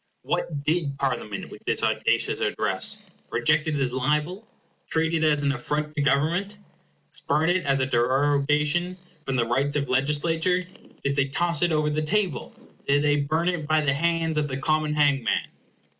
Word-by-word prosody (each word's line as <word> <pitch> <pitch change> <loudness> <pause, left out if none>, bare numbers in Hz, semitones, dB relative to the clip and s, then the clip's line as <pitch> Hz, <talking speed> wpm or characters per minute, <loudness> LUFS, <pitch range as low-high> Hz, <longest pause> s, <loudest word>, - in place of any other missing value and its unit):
What 145 -4 -2
did 150 -3 -1
Parliament 125 -7 -3
with - - -12
this - - 0
audacious - - +1
address?—Reject 155 +1 -1
it 155 - 0
as 135 -3 0
a 130 - -3
libel? 150 - -1 0.4
Treat 160 0 0
it 160 -1 +1
as 150 -2 +2
an 140 - +2
affront 150 +4 -3
to 145 - 0
Government? 160 +9 +1 0.5
Spurn 160 +3 +1
it 180 -4 -1
as 135 -1 +2
a - - +2
derogation 145 +7 +1 0.3
from 135 - -1
the 120 -2 +2
rights 135 +5 0
of 140 -3 -1
legislature? 160 +7 +1 0.4
Did 140 0 0
they 140 -1 +2
toss 170 +5 -1
it 175 -1 +2
over 150 -1 +1
the 155 +1 -1
table? 180 -2 -1 0.4
Did 145 +1 +3
they 145 0 +3
burn 155 +4 0
it 170 -4 -1
by 155 0 +3
the 140 -2 +1
hands 165 +1 0
of 150 - -1
the 130 -2 -4
common 155 +1 0
hangman? 140 -6 +1
150 Hz, 175 wpm, -25 LUFS, 140-160 Hz, 0.5 s, Did